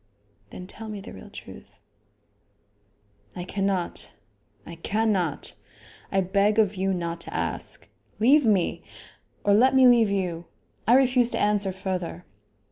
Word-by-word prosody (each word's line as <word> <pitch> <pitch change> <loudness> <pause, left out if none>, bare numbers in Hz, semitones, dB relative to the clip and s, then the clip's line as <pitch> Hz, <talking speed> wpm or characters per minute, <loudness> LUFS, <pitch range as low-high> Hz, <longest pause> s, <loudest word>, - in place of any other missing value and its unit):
"Then 180 - -9
tell 220 +4 -8
me 210 -1 -5
the 195 - -10
real 95 - -11
truth." - - -12 1.6
"I 180 - -4
cannot; 185 - -2 0.6
I 170 - -9
cannot. 200 -4 0 0.6
I 195 - +2
beg 200 +3 +2
of 210 -3 +3
you 195 0 -1
not 170 -2 -3
to - - -6
ask. - - -3 0.3
Leave 275 +7 +5
me! 205 -7 +1 0.6
or 205 - +4
let 260 +6 +5
me 260 -1 +7
leave 235 -3 +5
you. 180 -4 -2 0.4
I 240 - +6
refuse 250 -2 +4
to - - -1
answer 205 -2 +2
further." 185 -2 -4
200 Hz, 135 wpm, -25 LUFS, 180-220 Hz, 1.6 s, me